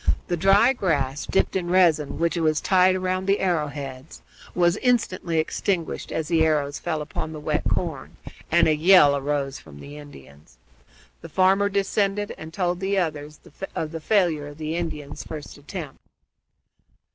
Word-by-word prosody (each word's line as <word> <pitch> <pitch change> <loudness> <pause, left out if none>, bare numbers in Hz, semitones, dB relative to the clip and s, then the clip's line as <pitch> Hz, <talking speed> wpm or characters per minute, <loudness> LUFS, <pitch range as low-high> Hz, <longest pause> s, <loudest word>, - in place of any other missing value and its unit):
The 175 - +1
dry 195 +8 +4
grass 145 - -1
dipped - - +1
in 175 -2 -1
resin, 170 -5 +3
which 170 +1 0
was 155 -2 +1
tied 185 0 +3
round 185 0 -2
the 200 +1 +2
arrow 170 -5 +1
heads, 135 -1 -9 0.3
was 175 -1 +3
instantly 225 -9 0
extinguished 165 +2 -2
as 160 -2 -2
the 165 -2 +3
arrows 145 -3 0
fell 160 -3 -2
upon 155 +1 -5
the 155 - -7
wet 150 - -1
corn, - - -3 0.3
and - - +4
a 155 - +3
yell 155 -3 +6
arose 140 -1 -2
from 70 -2 -14
the 145 - -10
Indians. 70 - -15 0.6
The - - -10
farmer 195 +2 +3
descended 200 +1 0
and 160 0 -10
told 175 0 -1
the 195 +1 -1
others 150 -4 -3 0.4
of 155 -1 -3
the 165 -1 -6
failure 165 -6 +1
of 145 0 -11
the 155 +1 -4
Indians' 150 -4 -5
first 150 -2 -8
attempt. 145 -1 -8
160 Hz, 160 wpm, -24 LUFS, 145-185 Hz, 0.6 s, yell